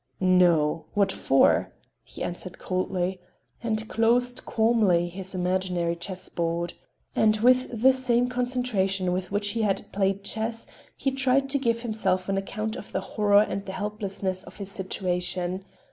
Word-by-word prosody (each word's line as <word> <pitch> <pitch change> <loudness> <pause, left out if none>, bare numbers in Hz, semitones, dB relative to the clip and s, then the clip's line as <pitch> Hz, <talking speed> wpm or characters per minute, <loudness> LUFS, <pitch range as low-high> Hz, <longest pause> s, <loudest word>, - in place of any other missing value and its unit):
"No. 175 -4 +3
What 200 -1 +3
for?" 135 -6 +3 0.3
he - - -7
answered 175 0 -4
coldly 185 0 -2 0.4
and 220 -1 -2
closed 245 +2 +1
calmly 215 -7 +3
his 190 +2 -5
imaginary 180 -2 0
chessboard. 170 -1 -3 0.4
And 215 0 +4
with 250 -1 +3
the 265 0 +7
same 250 -2 +2
concentration 245 -7 0
with 185 0 -3
which 205 0 0
he 225 +2 -1
had 200 -3 0
played 195 0 0
chess, 225 +2 -2 0.3
he 270 - 0
tried 270 0 +2
to 280 - +2
give 230 -2 0
himself 195 -5 0
an 195 - +1
account 215 +3 -4
of - - -9
the - - -1
horror 205 -1 +5
and 200 - -4
the 190 - -5
helplessness 200 -2 -2
of - - -13
his 200 -1 -5
situation. 185 -1 -2
195 Hz, 145 wpm, -26 LUFS, 185-230 Hz, 0.4 s, the